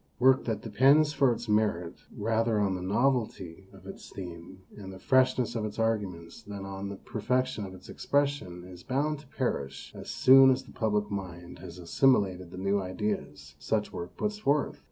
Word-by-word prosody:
Work 130 +1 +4
that 110 -3 -2
depends 140 +7 +4
for 135 -4 +3
its 120 0 -4
merit 105 -5 +1 0.2
rather 115 +1 +1
on 100 -2 +1
the 90 - -4
novelty 100 -4 -1
of 95 -1 -16
its 95 - -10
theme 90 0 -9
and 95 -2 -9
the 95 - -10
freshness 130 +1 +2
of 115 -2 -2
its 105 -1 -5
arguments 100 -7 -2
than 100 -1 -8
on 95 0 -6
the 100 - -6
per 110 - -8
fection 125 -2 0
of 95 - -10
its 95 - -14
expression 140 -12 -1
is 90 -1 -11
bound 145 - -1
to 150 - -16
perish 120 - -3
as - - -9
soon 135 +1 +7
as 130 0 +1
the - - -15
public 105 -2 -1
mind 90 -3 -6
has 85 - -10
assimilated 95 -1 +2
the 90 - -10
new 100 +1 0
ideas 90 -6 -4
such 105 +6 -1
work 85 +1 -7
puts 210 0 -2
forth. 145 -7 0
105 Hz, 185 wpm, -29 LUFS, 95-130 Hz, 0.2 s, soon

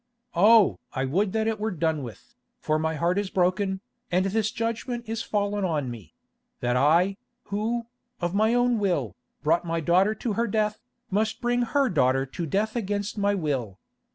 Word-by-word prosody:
Oh! 210 +4 +5
I 130 - -1
would 190 +9 +1
that 220 0 +1
it 220 -1 -1
were 215 +1 -1
done 160 -5 -1
with, 115 -6 -10 0.2
for 155 0 0
my 160 0 -1
heart 175 +5 +1
is 205 -2 -2
broken, 190 +1 +1 0.3
and 185 +2 +2
this 215 +2 +1
judgment 230 +2 -3
is 225 0 -2
fallen 205 -2 -1
on 150 -8 -1
me—that 120 +3 -7
I, 170 +9 +3 0.3
who, 225 +4 -1 0.3
of 175 0 -2
my 220 +3 +3
own 245 -1 +2
will, 145 - 0 0.3
brought 165 +3 +2
my 165 -1 -1
daughter 185 +6 +3
to 225 -2 -2
her 235 +3 0
death, 215 0 0 0.3
must 215 +3 0
bring 245 0 +1
her 275 +3 +2
daughter 135 - +2
to 165 +6 -5
death 215 - 0
against 205 -2 -2
my 200 0 +2
will. 135 - -2
195 Hz, 175 wpm, -26 LUFS, 160-220 Hz, 0.3 s, Oh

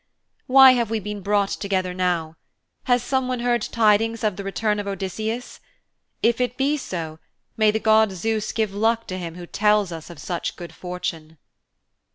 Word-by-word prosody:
'Why 265 0 +9
have 240 -3 +1
we 225 -1 -1
been 210 0 -6
brought 200 0 +1
together 185 -2 -2
now? 175 -3 -1 0.5
Has 245 -2 +2
someone 255 -1 -1
heard 240 -1 +1
tidings 225 +1 +2
of 210 -3 +1
the 200 - -6
return 210 +2 -1
of 205 - -4
Odysseus? 215 +5 -4 0.6
If 235 +2 +3
it 250 0 -1
be 280 +2 +2
so, 165 - -5 0.4
may 215 -1 +4
the 215 +1 +1
god 220 -1 +4
Zeus 215 +3 -2
give 215 -3 -1
luck 225 +2 +1
to 185 0 -4
him 170 -2 -6
who 175 0 -8
tells 210 0 +2
us 165 0 -8
of 170 - -10
such 170 +4 -4
good 175 -1 -9
fortune.' 165 -3 -6
210 Hz, 175 wpm, -23 LUFS, 180-230 Hz, 0.6 s, Why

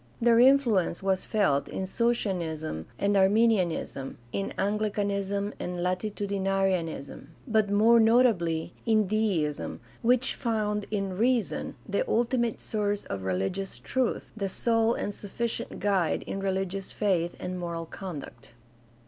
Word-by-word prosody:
Their 235 -1 +5
influence 240 -10 +4
was 190 -1 0
felt 145 -10 +1
in 190 - -3
Socinianism 175 - -1
and 200 0 +1
Arminianism, 190 - +2
in 195 - -2
Anglicanism 200 0 -1
and 180 0 -3
Latitudinarianism, 195 -6 -1 0.2
but 220 -3 +2
more 220 +3 +5
notably 220 -9 +3
in 215 -2 +4
Deism, 185 -8 -1 0.2
which 250 +2 +3
found 210 -3 -1
in 195 -3 -2
reason 235 +2 0
the - - 0
ulti 240 - +1
mate 235 -2 -1
source 205 -1 -1
of 100 - -4
religious 95 - -2
truth, 260 -2 -2
the 200 -3 -2
sole 225 +3 +2
and 205 - -3
sufficient 225 +4 -4
guide 195 -5 +1
in 195 - -4
religious 195 0 -2
faith 180 -5 0
and 180 0 -4
moral 170 -1 -4
conduct. 155 -10 -8
200 Hz, 125 wpm, -28 LUFS, 180-220 Hz, 0.2 s, Their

